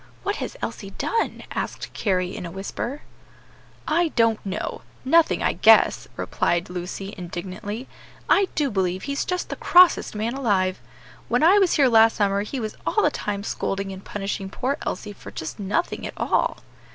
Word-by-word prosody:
what 405 - -1
has - - -5
Elsie 195 - -4
done?" 460 - -1
asked - - -4
Carry 185 -3 0
in - - -6
a 170 - -5
whisper. 200 - -5 0.8
"I 335 +2 +3
don't 230 -2 +3
know; 195 +1 -4 0.2
nothing 330 +4 +4
I - - +2
guess," - - +5
replied 175 +1 0
Lucy, 185 +3 -5
indignantly. 190 +6 -6 0.4
"I 395 -1 +4
do 290 -4 +1
believe 185 -2 -1
he's 280 0 -1
just 360 -1 -3
the - - -3
crossest 360 -9 +5
man 220 +3 -1
alive! 195 -8 +1 0.5
When - - +1
I 380 +5 +7
was 380 -3 +3
here 280 -3 +5
last 225 -1 +6
summer 200 -1 +1
he 235 +6 -4
was 215 -2 -4
all 425 - +1
the 300 - +3
time 200 -5 -3
scolding 195 -2 -2
and 190 0 -9
punishing 195 -1 -4
poor 260 +7 -2
Elsie 205 +3 -4
for - - -11
just 160 - -6
nothing 205 - -1
at - - -10
all." - - +1
210 Hz, 170 wpm, -24 LUFS, 190-280 Hz, 0.8 s, I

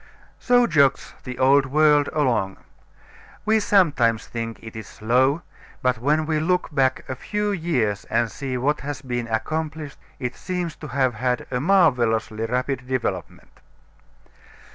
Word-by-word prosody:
So 245 -1 +4
jogs 140 - +2
the 125 -1 -6
old 135 +1 +4
world 150 +1 +4
along. 115 -10 0 0.9
We 220 +1 +3
sometimes 145 - +2
think 115 -1 -5
it 110 -1 -10
is 110 - -7
slow, 130 +8 +1 0.4
but 125 -2 +1
when 150 +5 +1
we 155 -1 0
look 180 0 0
back 130 -2 +1
a - - -3
few 210 +9 -2
years 145 - -1
and 115 -1 0
see 130 -2 -4
what 145 +4 0
has 145 -1 -6
been 120 -2 -3
accomplished 155 +5 -3 0.2
it 125 -2 -4
seems 180 -3 -4
to 155 - -8
have 130 -1 +1
had 125 +2 -1
a 125 - 0
marvelously 120 - +2
rapid 125 +1 -2
development. 100 -11 -4
130 Hz, 140 wpm, -23 LUFS, 120-155 Hz, 0.9 s, So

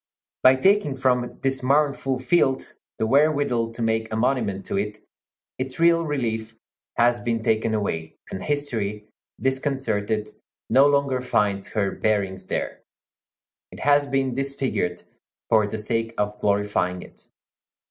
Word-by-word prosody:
By 130 0 +7
taking 190 0 +3
from 125 -2 0
this 135 0 +1
mournful 140 -1 +1
field 130 0 +1 0.2
the - - 0
wherewithal 140 -3 +2
to 115 - -7
make 110 0 0
a - - -1
monument 110 -5 0
to - - -2
it, 105 +1 -3 0.6
its 130 +3 -3
real 170 -1 +4
relief 115 -6 -2 0.4
has 120 0 +3
been 115 -1 -2
taken 110 0 +1
away, 80 -6 -3 0.2
and 95 - -5
history, 110 -8 -2 0.3
disconcerted, 115 -6 -1 0.4
no 135 +4 +6
longer 140 -3 +1
finds 100 -5 0
her 100 -2 -1
bearings 95 -3 -1
there. - - -3 0.9
It - - -10
has 145 0 +4
been 135 -2 0
disfigured 135 -9 -2 0.5
for 110 -2 +4
the 110 - -4
sake 115 +1 -2
of 105 0 -2
glorifying 100 -3 0
it. - - -16
120 Hz, 135 wpm, -24 LUFS, 105-135 Hz, 0.9 s, By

